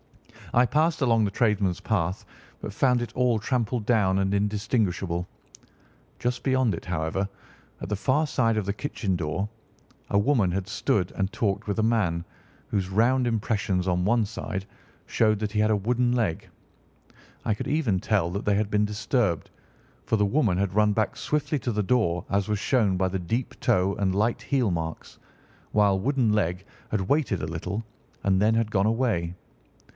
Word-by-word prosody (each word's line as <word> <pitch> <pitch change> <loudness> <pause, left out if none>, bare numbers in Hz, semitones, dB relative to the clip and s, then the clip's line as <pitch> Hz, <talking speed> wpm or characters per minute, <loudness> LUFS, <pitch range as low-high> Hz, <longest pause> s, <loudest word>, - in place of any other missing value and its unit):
I 120 +1 +5
passed 155 +5 +1
along 115 -4 +3
the 100 - 0
tradesmen's 105 -5 +1
path, 95 -3 -1 0.3
but 105 - -6
found 125 +1 +2
it 115 -1 -7
all 125 -2 +2
trampled 120 -1 -1
down 100 -5 +3
and 95 0 0
indistinguishable. 100 -4 0 0.9
Just 125 +1 -2
beyond 130 -5 +2
it, - - -5
however, 90 +3 -2 0.5
at - - -6
the 105 - -1
far 135 +9 +1
side 115 -5 +1
of 105 - -1
the 100 - -1
kitchen 105 -6 -2
door, 85 +4 -2 0.6
a 100 - +2
woman 105 -3 +3
had 95 +1 -2
stood 95 -4 0
and 95 +1 -2
talked 100 -2 -1
with 105 +2 -1
a - - +2
man, 95 -7 +1 0.4
whose 95 -2 -1
round 120 +6 +2
impressions 100 -5 0
on 90 -1 +1
one 110 +3 +2
side 100 -1 -5 0.4
showed 110 -2 +2
that 105 -1 -2
he 105 - +1
had 110 +1 +3
a - - +4
wooden 120 +4 +1
leg. 115 -9 -1 1.0
I 110 - +2
could 105 - -5
even 135 -10 +1
tell 95 -4 +1
that 100 +3 -3
they 105 - +2
had 105 0 0
been 105 0 +3
disturbed, 105 - -1 0.5
for 110 - +1
the 105 - +3
woman 105 -4 +2
had 95 -1 0
run 105 +1 +4
back 110 +1 0
swiftly 150 0 -1
to 120 0 -2
the 105 -1 0
door, 95 -6 +1
as 100 +1 0
was 105 -1 0
shown 110 -6 +2
by 95 0 +1
the 95 +1 -2
deep 115 +8 -3
toe 100 -6 +2
and 95 -2 0
light 110 +4 +1
heel 125 -7 +1
marks, 80 -1 -5 0.5
while 100 -2 +3
Wooden 125 -1 +1
leg 95 -2 0 0.2
had 105 - 0
waited 115 - 0
a - - -1
little, 90 +7 -4 0.4
and 95 -1 +2
then 110 +2 +3
had 115 -1 0
gone 100 0 +2
away. 110 -8 0
105 Hz, 180 wpm, -26 LUFS, 95-115 Hz, 1.0 s, I